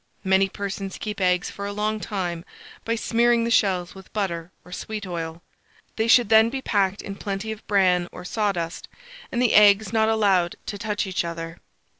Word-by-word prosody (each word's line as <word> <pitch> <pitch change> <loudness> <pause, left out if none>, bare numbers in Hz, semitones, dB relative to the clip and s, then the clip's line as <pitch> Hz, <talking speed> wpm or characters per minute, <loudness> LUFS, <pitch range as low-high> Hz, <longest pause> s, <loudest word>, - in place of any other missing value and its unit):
Many 190 0 +3
persons 195 0 -5
keep 210 -2 -5
eggs 180 -1 +1
for 200 0 -6
a - - -4
long 215 +1 -1
time 175 -5 -3 0.4
by 230 - -1
smearing 235 +1 +2
the 235 - -1
shells 185 -5 +2
with 190 -1 -14
butter 175 -5 -3
or 180 - -14
sweet 210 +2 -5
oil: 165 -2 -5 0.5
they 220 0 0
should 235 -1 +5
then 220 0 +6
be 270 +2 -3
packed 200 -5 0
in 200 - -6
plenty 200 +2 -4
of 220 0 -7
bran 185 -3 +3
or - - -10
sawdust, 180 -5 -2 0.4
and 240 - -1
the 245 -2 +3
eggs 205 0 +6
not 220 -1 +3
allowed 195 -6 +2
to 205 - -5
touch 210 -1 -2
each 185 -1 -1
other. 165 0 -6
200 Hz, 185 wpm, -24 LUFS, 180-220 Hz, 0.5 s, then